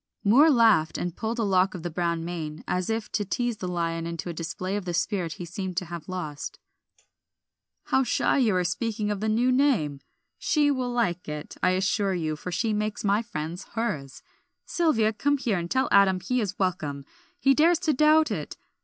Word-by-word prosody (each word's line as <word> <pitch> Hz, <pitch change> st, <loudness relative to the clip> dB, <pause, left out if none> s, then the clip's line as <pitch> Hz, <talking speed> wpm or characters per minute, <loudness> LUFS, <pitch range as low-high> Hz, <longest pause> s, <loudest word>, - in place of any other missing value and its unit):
Moor 260 Hz, +10 st, +6 dB
laughed 225 Hz, -, +4 dB
and 175 Hz, -1 st, -3 dB
pulled 225 Hz, +1 st, -3 dB
a 230 Hz, -, 0 dB
lock 190 Hz, -2 st, +2 dB
of 170 Hz, -, -7 dB
the 175 Hz, -, -2 dB
brown 170 Hz, 0 st, -1 dB
mane, 160 Hz, -3 st, -5 dB
as 180 Hz, +2 st, -1 dB
if 225 Hz, -1 st, -2 dB
to 210 Hz, -, 0 dB
tease 240 Hz, +3 st, -2 dB
the 185 Hz, -, -5 dB
lion 165 Hz, -1 st, -2 dB
into 170 Hz, +1 st, -5 dB
a -, -, -3 dB
display 185 Hz, +4 st, -4 dB
of 205 Hz, -, -2 dB
the 175 Hz, -1 st, -2 dB
spirit 180 Hz, -3 st, -1 dB
he 175 Hz, -, -7 dB
seemed 185 Hz, +1 st, -5 dB
to 180 Hz, -, 0 dB
have 170 Hz, 0 st, -8 dB
lost. 155 Hz, -6 st, -5 dB, 1.3 s
"How 265 Hz, -, +2 dB
shy 265 Hz, -, +1 dB
you 225 Hz, -7 st, +3 dB
are 180 Hz, -, +2 dB
of -, -, -2 dB
speaking 210 Hz, +3 st, -2 dB
the 210 Hz, +1 st, -1 dB
new 240 Hz, +4 st, +2 dB
name! 245 Hz, -, +2 dB, 0.4 s
'She' 295 Hz, -2 st, +2 dB
will 255 Hz, -3 st, -1 dB
like 200 Hz, -10 st, -1 dB
it, 150 Hz, 0 st, -6 dB
I 185 Hz, 0 st, +3 dB
assure 195 Hz, 0 st, +1 dB
you, 155 Hz, -3 st, -2 dB
for 180 Hz, +4 st, -7 dB
she 220 Hz, +5 st, 0 dB
makes 210 Hz, 0 st, -2 dB
my 205 Hz, +1 st, +2 dB
friends 170 Hz, -5 st, -6 dB
hers. 155 Hz, -, -3 dB, 0.4 s
Sylvia, 225 Hz, -11 st, +2 dB
come 285 Hz, +6 st, +1 dB
here, 225 Hz, -8 st, 0 dB
and 170 Hz, 0 st, -5 dB
tell 260 Hz, +4 st, +1 dB
Adam 195 Hz, -2 st, +5 dB
he 250 Hz, +6 st, -1 dB
is 200 Hz, -1 st, -3 dB
welcome; 155 Hz, -7 st, -2 dB, 0.3 s
he 275 Hz, -, +4 dB
dares 325 Hz, +5 st, +4 dB
to 320 Hz, -4 st, +2 dB
doubt 305 Hz, +3 st, +4 dB
it. -, -, -4 dB
195 Hz, 200 wpm, -26 LUFS, 170-235 Hz, 1.3 s, Moor